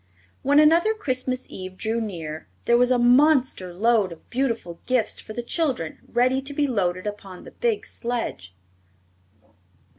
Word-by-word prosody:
When 285 Hz, +2 st, +3 dB
another 335 Hz, +8 st, +5 dB
Christmas 255 Hz, -8 st, -2 dB
Eve 185 Hz, 0 st, -8 dB
drew 225 Hz, +2 st, -1 dB
near 160 Hz, -7 st, -6 dB, 0.2 s
there 235 Hz, -, +4 dB
was 245 Hz, +1 st, +4 dB
a 255 Hz, -, +3 dB
monster 250 Hz, -, +3 dB
load 210 Hz, +1 st, +2 dB
of 165 Hz, -, -12 dB
beautiful 230 Hz, -10 st, -2 dB
gifts 255 Hz, -3 st, +1 dB
for 215 Hz, -, -9 dB
the 240 Hz, -, -4 dB
children 250 Hz, -, -1 dB
ready 255 Hz, +2 st, +2 dB
to 275 Hz, +2 st, -7 dB
be 295 Hz, -, +2 dB
loaded 185 Hz, -8 st, -1 dB
upon 200 Hz, -3 st, -7 dB
the -, -, -12 dB
big 465 Hz, -4 st, -1 dB
sledge. 230 Hz, -, -4 dB
240 Hz, 150 wpm, -24 LUFS, 190-265 Hz, 0.2 s, another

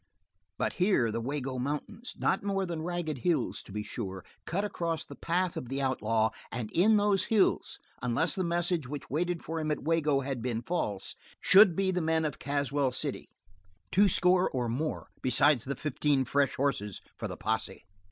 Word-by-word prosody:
But -, -, -1 dB
here 180 Hz, -, +3 dB
the 115 Hz, -, -2 dB
Wago 130 Hz, 0 st, -3 dB
Mountains 150 Hz, -, -4 dB
not 190 Hz, -, +1 dB
more 195 Hz, -1 st, -1 dB
than 170 Hz, -3 st, -4 dB
ragged 165 Hz, -4 st, -3 dB
hills, 155 Hz, -1 st, 0 dB
to -, -, -14 dB
be 105 Hz, +1 st, -3 dB
sure 95 Hz, -5 st, -6 dB, 0.2 s
cut 200 Hz, +4 st, -1 dB
across 165 Hz, -5 st, -2 dB
the -, -, -10 dB
path 180 Hz, +3 st, -1 dB
of 125 Hz, -, -5 dB
the 135 Hz, +1 st, -2 dB
outlaw 115 Hz, -5 st, +1 dB, 0.2 s
and 115 Hz, -3 st, -4 dB
in 210 Hz, +5 st, +4 dB
those 205 Hz, -2 st, +2 dB
hills, 215 Hz, -4 st, +2 dB, 0.2 s
unless 125 Hz, +8 st, +2 dB
the 190 Hz, -, +1 dB
message 170 Hz, -3 st, 0 dB
which 145 Hz, -1 st, -7 dB
waited 175 Hz, +3 st, -1 dB
for 165 Hz, +1 st, -3 dB
him 155 Hz, -1 st, -2 dB
at 150 Hz, -, -2 dB
Wago 150 Hz, -3 st, +2 dB
had 135 Hz, -2 st, -3 dB
been 120 Hz, -1 st, -2 dB
false, 105 Hz, -, -2 dB, 0.2 s
should 195 Hz, -3 st, +7 dB
be 195 Hz, +1 st, +1 dB
the 180 Hz, -1 st, 0 dB
men 160 Hz, 0 st, +1 dB
of 150 Hz, -, -3 dB
Caswell 140 Hz, -1 st, 0 dB
City, -, -, -3 dB, 0.6 s
two 200 Hz, +2 st, +5 dB
score 180 Hz, +1 st, +4 dB
or 125 Hz, -2 st, -2 dB
more 140 Hz, +7 st, -3 dB
besides 130 Hz, 0 st, +3 dB
the 140 Hz, +1 st, -3 dB
fifteen 145 Hz, -2 st, 0 dB
fresh 140 Hz, +1 st, +1 dB
horses 105 Hz, -8 st, -1 dB
for -, -, -4 dB
the -, -, -7 dB
posse. 110 Hz, -4 st, -3 dB
150 Hz, 180 wpm, -30 LUFS, 125-175 Hz, 0.6 s, should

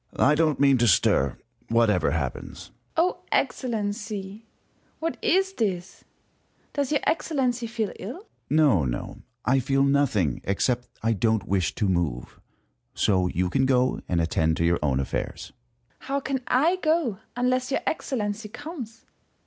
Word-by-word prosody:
Sun. -, -, +4 dB
I -, -, +5 dB
don't 155 Hz, -2 st, +2 dB
mean 140 Hz, -2 st, +5 dB
to 120 Hz, -, +3 dB
stir, 70 Hz, -, +3 dB, 0.3 s
whatever 115 Hz, -8 st, +3 dB
happens. 70 Hz, -4 st, -4 dB, 0.2 s
First -, -, -20 dB
Hour. 350 Hz, +3 st, +2 dB
Excellency! 210 Hz, -3 st, -2 dB, 0.5 s
what 330 Hz, +1 st, -2 dB
is 385 Hz, +2 st, +2 dB
this? 195 Hz, -, -3 dB, 0.7 s
Does 285 Hz, -2 st, -1 dB
your 290 Hz, -, +2 dB
Excellency 255 Hz, -7 st, 0 dB
feel 220 Hz, -2 st, -2 dB
ill? 225 Hz, +8 st, -5 dB
Sun. -, -, -23 dB, 0.2 s
No, 145 Hz, -, +4 dB
no; -, -, -4 dB, 0.2 s
I 135 Hz, +2 st, +3 dB
feel 135 Hz, +1 st, +2 dB
nothing, 140 Hz, -, +2 dB
except 120 Hz, +5 st, 0 dB
that -, -, -30 dB
I 115 Hz, -, +4 dB
don't 110 Hz, 0 st, +1 dB
wish 95 Hz, -4 st, 0 dB
to 105 Hz, -, 0 dB
move. 85 Hz, -10 st, -2 dB, 0.6 s
So 95 Hz, -3 st, +2 dB
you 90 Hz, +1 st, 0 dB
can 130 Hz, +4 st, +2 dB
go 130 Hz, -1 st, +2 dB
and 85 Hz, -, +1 dB
attend 80 Hz, -1 st, +1 dB
to 85 Hz, -, +1 dB
your 85 Hz, 0 st, +2 dB
own 70 Hz, -3 st, +1 dB
affairs. 70 Hz, -, -4 dB, 0.5 s
First 260 Hz, -, -14 dB
Hour. 275 Hz, -, 0 dB
How -, -, +2 dB
can 270 Hz, -1 st, -2 dB
I 320 Hz, +9 st, +3 dB
go 310 Hz, -, +1 dB, 0.2 s
unless 255 Hz, +1 st, +1 dB
your 275 Hz, -, 0 dB
Excellency 215 Hz, -7 st, -2 dB
comes 240 Hz, -5 st, -8 dB
155 Hz, 160 wpm, -25 LUFS, -, 0.7 s, I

